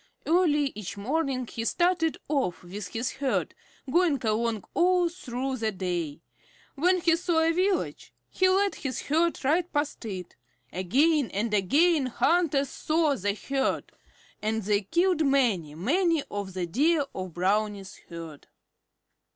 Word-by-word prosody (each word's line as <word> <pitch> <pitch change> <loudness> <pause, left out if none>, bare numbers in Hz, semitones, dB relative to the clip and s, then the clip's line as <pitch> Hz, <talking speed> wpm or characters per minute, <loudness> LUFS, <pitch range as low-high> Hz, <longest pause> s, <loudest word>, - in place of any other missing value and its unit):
Early 300 -5 +3
each 200 -1 -7
morning 260 +3 -1
he 230 0 -5
started 345 +4 +1
off 270 - -1
with 185 +2 -7
his 230 +6 -3
herd, 270 -1 -1 0.3
going 320 0 +2
along 220 -1 0
all 355 0 +3
through 265 -5 -4
the 220 -2 -1
day. 175 -5 -3 0.5
When 360 +5 +2
he 330 -1 +4
saw 335 -1 +1
a 325 0 +3
village, 370 +2 -1 0.2
he 375 0 +3
led 395 +1 +2
his 260 -4 -4
herd 325 0 0
right 335 +5 +2
past 290 -2 -2
it. 185 -5 -6 0.4
Again 270 - +2
and 210 +2 -2
again 280 - +3
hunters 285 +1 +2
saw 310 -1 +1
the 205 -2 -1
herd, 270 +5 -2 0.5
and 220 +1 -1
they 205 +1 +1
killed 340 - +1
many, 230 - +1
many 320 - +1
of 200 -2 -5
the 180 -1 -1
Deer 290 - +2
in 185 0 -5
Brownie's 195 +2 -1
herd. 165 -4 -9
270 Hz, 140 wpm, -27 LUFS, 205-330 Hz, 0.5 s, he